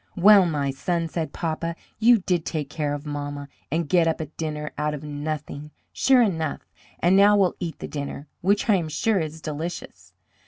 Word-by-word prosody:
"Well, 195 Hz, 0 st, +7 dB
my 145 Hz, -4 st, -1 dB
son," 165 Hz, +5 st, -1 dB
said 160 Hz, -3 st, -3 dB
papa, 165 Hz, 0 st, -3 dB, 0.2 s
"you 235 Hz, +2 st, +6 dB
did 175 Hz, -3 st, 0 dB
take 150 Hz, -3 st, -4 dB
care 150 Hz, -2 st, -1 dB
of 145 Hz, +1 st, -8 dB
mamma, 145 Hz, -1 st, -5 dB, 0.2 s
and 165 Hz, +1 st, 0 dB
get 170 Hz, +1 st, +3 dB
up 160 Hz, -, 0 dB
a 160 Hz, -, -2 dB
dinner 150 Hz, 0 st, -5 dB
out 150 Hz, 0 st, -1 dB
of 145 Hz, -, -9 dB
nothing, 150 Hz, 0 st, -5 dB, 0.2 s
sure 260 Hz, -2 st, +4 dB
enough; 160 Hz, -8 st, -2 dB, 0.3 s
and 180 Hz, +2 st, +3 dB
now 205 Hz, +1 st, +6 dB
we'll 190 Hz, -3 st, +2 dB
eat 170 Hz, -2 st, -4 dB
the -, -, -6 dB
dinner, 145 Hz, 0 st, -5 dB, 0.2 s
which 200 Hz, +5 st, +2 dB
I 210 Hz, -3 st, +5 dB
am 165 Hz, -3 st, -3 dB
sure 195 Hz, +7 st, +1 dB
is 160 Hz, -1 st, -4 dB
delicious." 145 Hz, -, -6 dB
160 Hz, 190 wpm, -24 LUFS, 145-180 Hz, 0.3 s, Well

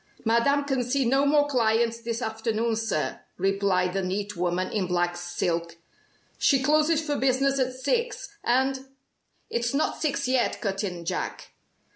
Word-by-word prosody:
"Madame 235 Hz, +6 st, +3 dB
can 270 Hz, -3 st, 0 dB
see 255 Hz, +2 st, 0 dB
no 270 Hz, +4 st, +3 dB
more 290 Hz, 0 st, +4 dB
clients 230 Hz, -3 st, +1 dB
this 230 Hz, +1 st, -3 dB
afternoon, 225 Hz, +1 st, -1 dB
sir," 220 Hz, -9 st, -2 dB, 0.2 s
replied 190 Hz, -1 st, +1 dB
the 195 Hz, -, 0 dB
neat 200 Hz, +2 st, -3 dB
woman 180 Hz, +1 st, -1 dB
in 195 Hz, -4 st, 0 dB
black 175 Hz, 0 st, 0 dB
silk. 170 Hz, -1 st, -2 dB, 0.6 s
"She 270 Hz, -2 st, +3 dB
closes 305 Hz, +2 st, +3 dB
for 295 Hz, -1 st, -1 dB
business 270 Hz, +1 st, +2 dB
at 255 Hz, -1 st, +1 dB
six, 460 Hz, -, -2 dB
and 265 Hz, +2 st, +1 dB, 0.3 s
" -, -, -45 dB
"It's 235 Hz, +2 st, -1 dB
not 300 Hz, -, 0 dB
six 280 Hz, -3 st, 0 dB
yet," 255 Hz, -1 st, +1 dB
cut 195 Hz, -2 st, -2 dB
in 180 Hz, -4 st, -4 dB
Jack. -, -, -4 dB
235 Hz, 155 wpm, -26 LUFS, 195-270 Hz, 0.6 s, more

